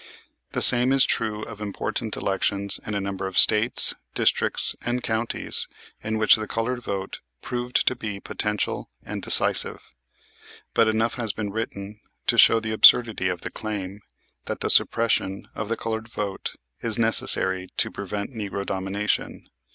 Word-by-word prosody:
The - - +2
same 125 +1 +6
is 135 -1 +4
true 110 -1 -2
of 105 -2 -10
important 100 -2 -4
elections 100 +1 -1
in 105 - -5
a - - -1
number 95 -1 -4
of 95 - -6
States, 110 +3 +6 0.2
districts - - +2
and 120 +1 -3
counties 110 0 -2 0.4
in 110 0 -3
which 110 0 +5
the 110 0 -6
colored 120 +3 -3
vote 95 -4 -5 0.2
proved 125 0 -2
to 130 - +2
be 105 -5 -6
potential 105 +1 -4 0.2
and - - -6
decisive. - - +5 0.9
But 115 -1 +3
enough 110 +1 0
has 115 -4 -2
been 105 -2 -5
written 105 -1 -6 0.3
to - - +2
show 115 - +6
the 110 -1 -5
absurdity 110 -3 +5
of 90 -2 -4
the - - -7
claim 105 -2 -6 0.4
that - - -6
the - - 0
suppression 110 -4 +1
of 105 0 -6
the 115 - -2
colored 110 0 -5
vote 105 -4 -5 0.3
is 115 -2 +1
necessary 95 -4 +2
to - - 0
prevent 100 +3 -6
"Negro 100 -3 -5
Domination." 100 +2 -3
105 Hz, 155 wpm, -23 LUFS, 100-115 Hz, 0.9 s, same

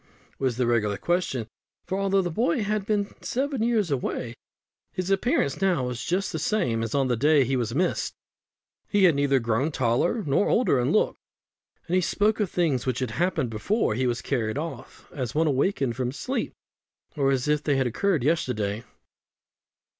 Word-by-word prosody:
was 130 -3 0
the 125 - +1
regular 105 -4 +1
question; 170 -10 -1 0.4
for 190 +1 -2
although 195 -1 +2
the 175 - -2
boy 235 - +1
had 210 0 -1
been 205 -2 +1
seven 270 -1 -2
years 225 -7 +1
away, 125 -3 -2 0.6
his 185 +1 -3
appearance 195 - +1
now 180 -9 +2
was 125 -1 -4
just 185 +3 -1
the 160 - -3
same 150 - 0
as 115 +3 -3
on 135 -2 +2
the 125 - +1
day 145 +4 +4
he 135 +2 0
was 120 -1 -1
missed. 180 +4 0 0.7
He 205 -2 +2
had 175 -3 +7
neither 140 -1 +2
grown 120 +5 0
taller 135 - +1
nor 145 +7 +2
older 225 - +3
in 125 +4 +1
look, 215 - +2 0.7
and 175 - -5
he 185 - +4
spoke 210 +5 +1
of 205 -4 0
things 150 -9 0
which 125 -2 0
had 130 -3 -2
happened 130 -3 0
before 115 - 0
he 130 +3 0
was 120 -1 -2
carried 115 -3 -1
off 160 +2 -7
as 125 -3 -4
one 160 +2 +3
awakened 135 -3 +1
from 125 -1 -2
sleep, 255 - -3 0.6
or 140 -3 +2
as 135 0 0
if 150 0 +2
they 145 -2 +1
had 135 - +2
occurred 160 - 0
yesterday. 120 -9 0
145 Hz, 185 wpm, -26 LUFS, 125-190 Hz, 0.7 s, had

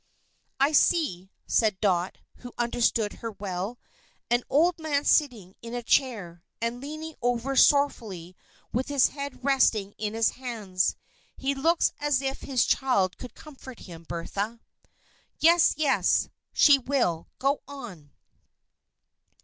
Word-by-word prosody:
"I 275 +2 +3
see," 280 - +2 0.2
said 215 -4 +1
Dot, 185 -3 0 0.2
who 245 -1 -11
understood 235 -3 0
her 230 - -3
well, 195 +2 -5 0.5
"an 240 0 +2
old 330 +4 +3
man 295 -2 -1
sitting 230 - +1
in 230 +1 -7
a 240 - -4
chair, 205 -10 0 0.2
and 235 +2 -3
leaning 310 +3 -7
over 245 +2 -1
sorrowfully 220 - +2 0.4
with 250 +3 -1
his 285 -3 +3
head 280 -2 -7
resting 225 -7 +2
in 210 0 -3
his 225 0 +2
hands. 215 -8 -2 0.4
He 275 +1 -1
looks 325 +5 +1
as 290 -3 +1
if 270 0 -3
his 260 -3 +1
child 200 -9 +1
should 250 - -9
comfort 265 -5 -12
him, 170 -3 -11
Bertha." 200 +7 -4 0.8
"Yes, 335 +1 +5
yes. 295 -3 +2 0.2
She 285 -2 +6
will. 240 -11 -1
Go 275 +2 0
on." 220 - -10
245 Hz, 130 wpm, -26 LUFS, 205-280 Hz, 0.8 s, She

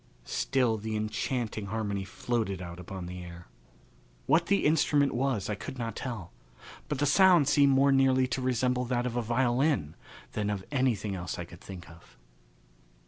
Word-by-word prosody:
Still 125 - +1
the 110 +1 -4
enchanting 110 0 -2
harmony 100 -2 -2
floated 100 0 -2
out 85 -1 -8
upon 90 0 -7
the 90 +1 -7
air. 85 0 -10 0.8
What 170 +1 +3
the 200 - +2
instrument 145 -2 +3
was 120 -5 0
I 105 - -1
could 105 +6 -7
not 115 -2 -4
tell; 115 -9 -5 0.6
but 150 - -1
the 145 - +1
sound 175 0 +5
seemed 140 -1 +5
more 135 +1 +4
nearly 135 -1 +4
to 130 - -2
resemble 125 0 +1
that 120 0 -1
of 125 -1 -3
a 120 - +1
violin 120 - +1 0.4
than 105 -1 -2
of 100 -2 -3
anything 120 -7 0
else 90 -1 -4
I 90 - -5
could 85 0 -14
think 95 -3 -9
of. 80 -7 -17
120 Hz, 170 wpm, -29 LUFS, 100-135 Hz, 0.8 s, sound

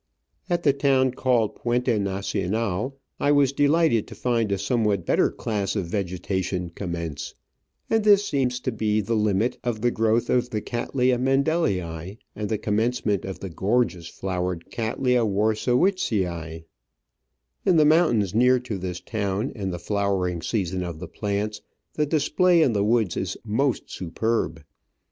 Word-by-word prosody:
At 175 -1 0
the 140 - +4
town 135 -2 +2
called 125 -4 +1
Puente 120 -1 0
Nacional 100 +4 -2 0.2
I 145 - +2
was 140 -2 +4
de 145 +1 +2
lighted 155 -8 +3
to - - -10
find 115 -4 0
a 100 - +1
somewhat 100 -2 0
better - - +3
class 105 -3 -2
of 100 -4 -1
vegetation 90 -1 -2
commence, 85 -5 -5 0.5
and 225 -1 +2
this 205 -1 +5
seems 130 -5 0
to 130 - -1
be 110 -1 0
the 110 +2 -1
limit 105 +1 +1
of 120 -3 -2
the 120 +1 +2
growth 115 +1 +1
of 125 0 +1
the 110 - -2
Cattleya 125 +2 0
Mendelii, 105 - 0 0.2
and 105 -1 -4
the 110 - 0
commence 110 +5 -1
ment 105 -3 0
of 95 - -6
the 95 - -5
gorgeous 95 -2 0
flowered 90 -2 -4
Cattleya 120 +2 +1
Warscewiczii, 105 - 0 1.0
In 185 - +3
the 155 -2 +5
mountains 150 - +3
near 125 +3 +5
to 120 -6 -5
this 90 -1 -4
town, 105 +2 -2
in 100 -4 -4
the 90 - -3
flowering 95 -2 -1
season 95 -2 -1
of 85 -3 -5
the 90 +2 -7
plants, 105 +3 -3 0.3
the 150 -1 0
display 165 +3 +3
in 125 - +2
the 100 -1 +1
woods 110 -4 +2
is 95 0 -3
most 125 +5 0
superb. 90 -3 -2
110 Hz, 155 wpm, -24 LUFS, 95-125 Hz, 1.0 s, this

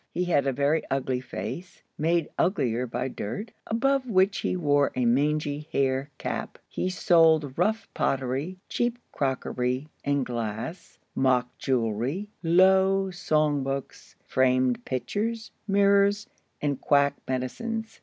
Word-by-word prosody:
He 180 - -2
had 145 -6 +2
a - - +3
very 145 +4 +1
ugly 130 -1 0
face, 130 - -7
made 165 +1 +1
uglier 125 - +1
by 125 +2 -2
dirt, 130 - -5 0.2
above 265 +3 +1
which 190 -1 +3
he - - -1
wore 145 -4 +2
a 125 -1 +1
mangy 150 +4 +1
hair 135 +1 0
cap. - - -4
He 185 - -2
sold 160 -6 +4
rough 215 +4 0
pottery, 135 +7 -1
cheap 240 0 -1
crockery 130 0 -1
and 140 -2 +1
glass, 115 - -5 0.2
mock 125 -2 +1
jewelry, 130 - -1
low 190 +2 +4
song 155 -4 +1
books, 135 0 -5
framed 130 -1 +2
pictures, 220 - -3 0.2
mirrors, 200 0 +3 0.4
and 140 -2 -1
quack 140 -1 +3
medicines. 225 - -3
145 Hz, 125 wpm, -27 LUFS, 130-190 Hz, 0.4 s, sold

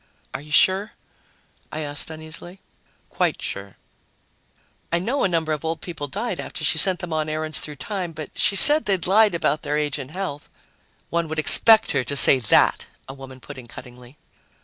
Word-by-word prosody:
"Are - - -6
you 150 +1 -14
sure?" 190 +7 +2 0.8
I 155 - -5
asked 145 +1 -3
uneasily. 160 +3 -8 0.5
"Quite - - -1
sure." 100 -1 -7 1.1
"I 170 - +1
know 235 +11 -2
a - - +3
number 165 -3 -2
of 150 - -6
old 160 0 -4
people 160 -5 -7
died 210 - -5
after - - -7
she - - +1
sent 190 -2 +2
them 175 -3 -6
on 155 0 -2
errands 155 0 -4
through 150 - -6
time, 185 +2 -6
but 155 -2 -9
she 200 - +1
said 295 +10 +8
they'd 190 -3 -1
lied 205 0 +3
about 155 -2 -1
their 150 - -3
age 150 -1 -2
and 135 -1 -8
health." 170 -4 -7 0.6
"One 170 -1 -1
would 160 +1 -6
expect 220 +8 +5
her 135 -3 -1
to 140 - -5
say 140 -1 +6
that," 115 - +2 0.2
a 135 - -9
woman 135 -1 -13
put 130 - -11
in 120 - -13
cuttingly. 125 +2 -14
155 Hz, 190 wpm, -21 LUFS, 145-185 Hz, 1.1 s, said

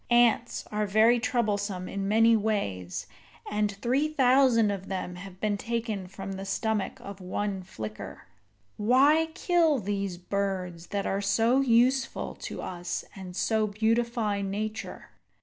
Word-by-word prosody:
Ants 240 0 +3
are 210 0 0
very 220 +4 +5
troublesome 205 -6 -1
in 195 0 -3
many 225 +2 +5
ways, 150 - -2 0.5
and 210 0 +1
three 250 +9 0
thousand 255 -6 +4
of 195 -1 -5
them 185 -2 -4
have 185 +1 -10
been 210 -1 0
taken 225 -5 -3
from 195 +1 -7
the 195 0 -5
stomach 210 +1 -1
of 200 -1 -9
one 195 +1 -2
flicker." 110 - -8 0.5
Why 275 +9 +4
kill 340 -5 +3
these 200 -4 -2
birds 185 -2 -3
that 200 -1 -2
are 195 +1 0
so 225 +5 +3
useful 255 +1 +2
to - - -6
us 175 -1 -4
and 185 -2 -8
so 220 +2 +1
beautify 220 0 0
nature? 215 +3 -4
210 Hz, 135 wpm, -28 LUFS, 195-235 Hz, 0.5 s, very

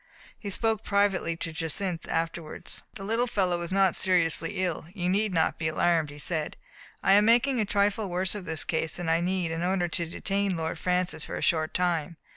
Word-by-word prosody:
*' - - -24
He 205 - -5
spoke 220 +1 +1
privately 200 -4 +1
to 165 -1 -4
Jacynth 165 +2 -3
afterward. 165 -1 -3 0.2
"The 195 - -7
little 225 +4 0
fellow 185 -6 0
is 170 - -2
not 195 -1 +3
seriously 175 -1 +2
ill; 165 -2 -3
you 180 -3 -2
need 200 +3 +1
not 165 -3 +1
be 160 - -1
alarmed," 160 -1 +1
he 145 - -11
said. 155 +1 -2 0.5
''I - - +4
am 205 +2 +6
making 245 +3 +4
a 215 - +2
trifle 200 0 +1
worse 180 +1 -1
of 205 -3 -7
his 160 -2 +1
case 160 -1 -1
than 175 -2 -3
I 165 +1 +2
need 180 -1 -1
in 165 0 -3
order 180 0 +1
to 170 0 -2
detain 195 0 -1
Lord 160 0 -3
Francis 180 -3 0
for - - -6
a - - -4
short 155 -2 +1
time. 170 -3 0
180 Hz, 210 wpm, -27 LUFS, 165-200 Hz, 0.5 s, am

